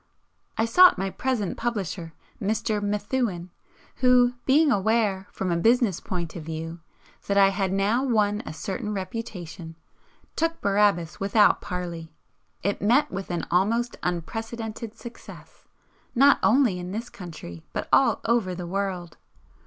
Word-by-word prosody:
I 225 - +2
sought 360 - +7
my 195 +1 -2
present 245 -7 -2
publisher, 190 -8 -3 0.3
Mr. 215 +1 0
Methuen, 205 -3 -2 0.5
who, 250 -1 +4
being 290 +2 +5
aware, 205 -2 +1
from 185 -2 -3
a - - +2
business 230 0 +3
point 170 -3 -5
of 170 - -5
view, 165 +1 -6 0.5
that 200 - +1
I 195 -1 +7
had 195 -1 -1
now 205 +6 +1
won 215 -5 +1
a - - -7
certain 195 +6 -4
reputation, 185 -4 -6 0.6
took 330 +1 0
"Barabbas" 200 -5 +1
without 205 +2 +4
parley. 175 -4 -5 0.5
It 200 +2 -1
met 240 +8 +3
with 195 0 -5
an 175 -1 -2
almost 230 +7 +1
unprecedented 225 +5 -4
success, 235 -1 -12 0.5
not 275 +3 +6
only 235 -7 +3
in 180 0 -6
this 230 +3 -4
country 155 - -9
but - - -4
all - - +4
over 220 -6 +1
the 175 0 -6
world. 185 -2 -3
200 Hz, 135 wpm, -25 LUFS, 180-230 Hz, 0.6 s, sought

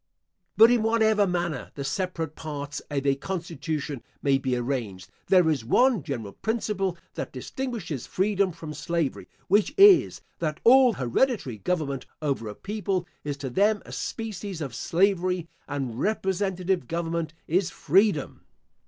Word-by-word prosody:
* - - -50
But 225 +2 +8
in 245 -2 +3
whatever 220 -2 +3
manner 175 -4 -2
the 140 - -4
separate 160 +1 -3
parts 145 -2 -5
of 140 -2 -2
a 140 - +4
constitution 155 -3 -4 0.2
may 135 -1 +3
be 130 -2 -1
arranged, 120 -7 -3 0.2
there 180 -3 +5
is 150 -7 +1
one 245 - +3
general 120 -8 -5
principle 210 -5 -2 0.2
that - - -5
distinguishes 175 - -5
freedom 195 0 +1
from 160 -2 -8
slavery, 170 -3 -2 0.2
which 210 +9 +2
is, 395 -2 +7 0.2
that 155 -2 -2
all 255 0 +7
hereditary 130 - 0
government 140 - -2
over 140 -7 -2
a 105 - -6
people 195 -3 -2 0.2
is 145 -1 -3
to 140 -2 -5
them 205 - +2
a - - -11
species 205 -5 -5
of 140 -6 -4
slavery, 180 - +1 0.2
and 130 -5 -4
representative 190 -2 0
government 165 -1 -2
is 180 +3 +1
freedom. 190 -2 +1
170 Hz, 145 wpm, -26 LUFS, 140-200 Hz, 0.2 s, But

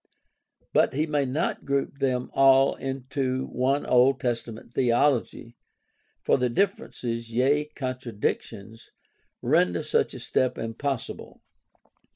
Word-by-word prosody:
But - - +3
he 150 +3 +1
may 150 -3 0
not 135 +6 -2
group 140 0 -2
them 125 -2 -1
all 135 0 +5
into 130 0 -3
one 135 +3 0
Old 125 +2 +4
Testament 115 -1 -4
theology, 120 -1 +1 0.7
for - - +3
the 125 0 +1
differences, 120 - -2
yea, 135 +6 +2
contradictions, 115 -5 -5 0.5
render 90 -1 +2
such - - 0
a - - -7
step 130 - 0
impossible. 115 +3 -5
130 Hz, 110 wpm, -26 LUFS, 120-135 Hz, 0.7 s, all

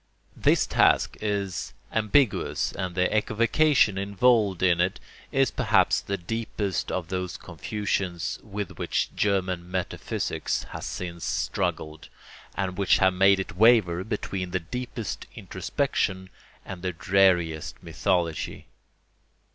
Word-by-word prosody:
This - - +3
task - - +3
is 100 -3 -2 0.2
ambiguous, 110 +3 +1
and 90 -2 -4
the 90 +3 +1
equivocation 115 +1 +3
involved 100 -1 +2
in 85 -2 +4
it 95 +1 0 0.3
is - - +2
perhaps - - +3
the 100 - -3
deepest 105 +1 -3
of 90 -2 -3
those 90 -1 -3
confusions 95 -1 -3
with 105 -2 -6
which - - -1
German 95 -3 0
metaphysics 90 -1 -2
has - - -6
since 85 -2 -6
struggled, 75 0 -2 0.5
and 95 -1 -3
which 100 - +4
have 95 -1 +4
made 95 +1 +5
it 95 - -5
waver 105 -6 +5
between 95 -3 -3
the 95 +1 -1
deepest 115 +4 -5
introspection 95 0 -2 0.3
and 95 -2 -7
the 90 0 -2
dreariest 85 -4 +2
mythology. 85 -1 -1
95 Hz, 115 wpm, -26 LUFS, 90-105 Hz, 0.5 s, made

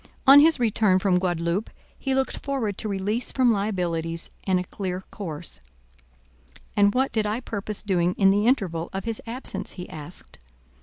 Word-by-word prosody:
On 275 +1 +10
his 315 -1 +5
return 215 -4 +3
from 185 -1 +2
Guadaloupe, 175 +2 -1 0.3
he 270 -1 -1
looked 265 0 -1
forward 260 -8 -1
to 215 - -3
release 205 +5 -1
from 255 -3 +3
liabilities 175 -6 -2
and 185 -2 +2
a - - -2
clear 185 0 -5
course; 155 - -6 1.2
and 205 +1 +4
what 265 +1 +2
did 215 -2 0
I 215 +3 -1
purpose 210 -4 -4
doing 180 -3 +1
in 195 -1 +5
the 205 +3 +2
interval 180 -10 +1
of 195 0 -3
his 225 -1 -3
absence? 245 +4 -4
he 180 -1 -7
asked. 155 - -9
200 Hz, 165 wpm, -25 LUFS, 180-230 Hz, 1.2 s, On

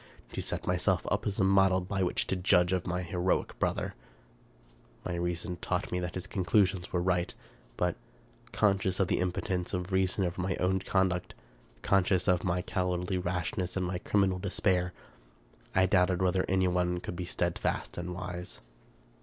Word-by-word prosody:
To - - -2
set - - -2
myself - - +1
up - - 0
as 100 - -2
a - - +4
model 95 -1 +4
by 95 +2 -3
which 90 - +1
to - - 0
judge 90 -1 +3
of 95 0 -1
my 90 0 -1
heroic 90 +1 -1
brother! - - -1 1.1
My 90 - -2
reason 85 0 -2
taught 90 0 -2
me 90 - 0
that 90 -1 -4
his 90 0 -3
conclusions 95 -1 +1
were 90 -1 0
right; 90 -1 +1 0.5
but, 90 -1 +1 0.6
conscious 95 -3 +2
of 95 - +2
the - - +2
impotence 90 0 -1
of 90 +1 -4
reason 95 +1 +2
over 90 +1 -3
my 90 -1 -1
own 95 +1 +1
conduct, 95 -2 0 0.5
conscious 95 -2 +3
of 90 -2 +3
my 90 0 0
cowardly 90 -1 -1
rashness 90 +1 -2
and 95 - 0
my 90 0 -2
criminal 95 -2 +1
despair, 90 -1 +1 0.8
I 95 0 +5
doubted 90 -1 +3
whether 95 0 +2
anyone 90 -1 +2
could 85 - -6
be 90 +1 -4
steadfast 85 0 -2
and 85 +1 -4
wise. 90 0 -6
90 Hz, 165 wpm, -30 LUFS, 90-95 Hz, 1.1 s, I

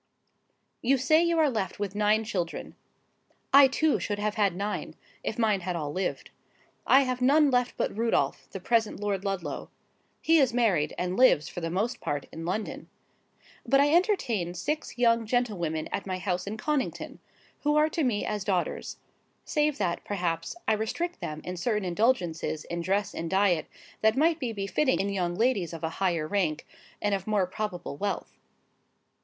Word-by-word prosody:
'You 270 +3 +3
say 310 +5 +4
you 340 -1 +1
are 310 -2 +4
left 215 -5 -2
with 200 -2 -3
nine 210 +1 +2
children. 180 -6 -4 0.8
I 280 0 +9
too 310 +3 +1
should 205 - -2
have 210 0 -1
had 200 -5 +1
nine, 205 +3 -3 0.3
if - - -3
mine 215 -4 +2
had 180 0 -3
all 150 -3 -3
lived. 185 +2 -3 0.6
I 270 - +7
have 255 -2 -2
none 285 +3 +5
left 250 0 +1
but - - -1
Rudolph, 230 +1 0
the 195 - -7
present 225 +2 +1
Lord 200 -2 -2
Ludlow. 195 -4 -3 0.5
He 325 0 +4
is 255 -4 +2
married, 190 -11 +2
and 180 +1 -2
lives, 250 - +5
for 175 - -6
the 165 - -2
most 205 +8 -1
part, 145 -1 -2
in 165 0 -7
London. 205 +5 -4 0.7
But 275 +3 +3
I 290 +2 +4
entertain 250 - +1
six 295 - -3
young 230 -2 +3
gentlewomen 190 -10 -1
at 200 - -3
my 185 -1 -2
house 180 0 -2
at 215 +2 -4
Connington, 295 +2 -2 0.4
who 295 0 +1
are 305 +1 +4
to 315 0 -1
me 230 -6 0
as 210 -2 -2
daughters—save 280 - -3
that, 175 -8 -1
perhaps, 175 - -2
I 220 - +4
restrict 335 +12 -2
them 155 0 -5
in 180 0 -5
certain 210 +1 -1
indulgences 175 -6 0
in 170 0 -4
dress 200 +3 0
and 165 - -4
diet 190 -3 +2 0.3
that 220 +3 +3
might 325 +2 +3
be 250 -5 -2
befitting 215 +7 0
in 200 - 0
young 180 -3 -1
ladies 205 -7 +1
of 165 0 -8
a 160 - 0
higher 170 -5 +1
rank, 165 -5 -1 0.4
and 205 -1 +1
of 195 0 -2
more 210 -3 +2
probable 180 -5 -5
wealth. 175 - -4
205 Hz, 175 wpm, -28 LUFS, 180-250 Hz, 0.8 s, I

